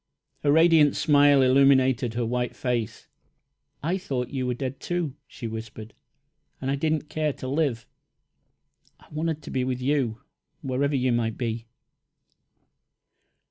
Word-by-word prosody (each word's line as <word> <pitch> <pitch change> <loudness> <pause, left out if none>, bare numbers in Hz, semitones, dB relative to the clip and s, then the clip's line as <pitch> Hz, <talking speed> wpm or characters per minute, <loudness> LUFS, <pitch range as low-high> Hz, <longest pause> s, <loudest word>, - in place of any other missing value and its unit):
A 145 - +3
radiant 160 -2 +5
smile 145 -2 +5
illumined 130 -1 +4
her 120 0 0
white 125 +1 -2
face. 120 -3 -3 0.8
"I 175 +5 0
thought 130 -10 -3
you 130 -3 -2
were 125 - -1
dead, 130 +1 -5
too," 175 -6 -2
she - - -9
whispered, 110 -1 -7 0.7
"and 135 0 -2
I - - +1
did 155 +2 0
not 155 -1 -3
care 155 -1 -1
to 130 - -7
live. 135 -5 -1 1.1
I - - -20
wanted 155 0 -2
to - - -8
be 130 - 0
with 125 -1 -2
you, 130 -4 0 0.4
wherever 140 +2 0
you 130 -1 +1
might 115 -2 0
be." 115 -1 -3
130 Hz, 140 wpm, -25 LUFS, 125-150 Hz, 1.1 s, radiant